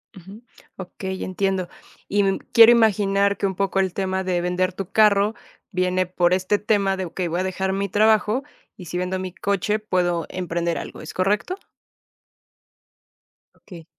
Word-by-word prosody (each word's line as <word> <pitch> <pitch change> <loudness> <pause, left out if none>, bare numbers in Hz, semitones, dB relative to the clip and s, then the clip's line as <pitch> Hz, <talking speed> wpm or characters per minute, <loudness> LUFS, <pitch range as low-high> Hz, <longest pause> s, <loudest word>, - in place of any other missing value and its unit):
Ujú, 195 +6 -13 0.3
okey, 190 0 -6
entiendo, 190 -1 -1 0.4
y, 205 +1 +1
mm, 195 0 +1 0.2
quiero 230 0 +9
imaginar 200 -3 +3
que 200 - 0
un 190 - -4
poco 195 0 0
el 190 -2 0
tema 190 -1 -1
de 180 -2 -1
vender 180 +1 0
tu 190 +1 -7
carro 210 0 +4 0.4
viene 185 0 0
por 180 0 +1
este 190 +2 0
tema 200 -3 +1
de: 190 - -3
"Okey, 175 +1 -4
voy 175 +2 -2
a - - 0
dejar 190 +1 -2
mi 200 0 -2
trabajo 215 +5 +2 0.3
y 180 - -10
si 175 +2 -5
vendo 180 +1 -2
mi 185 -1 -5
coche, 200 +2 -1
puedo 175 -5 -1
emprender 170 -2 -2
algo", - - -8
¿es 155 - -9
correcto? 205 - 0 2.0
Okey. 170 -5 -13
190 Hz, 165 wpm, -22 LUFS, 180-200 Hz, 2.0 s, quiero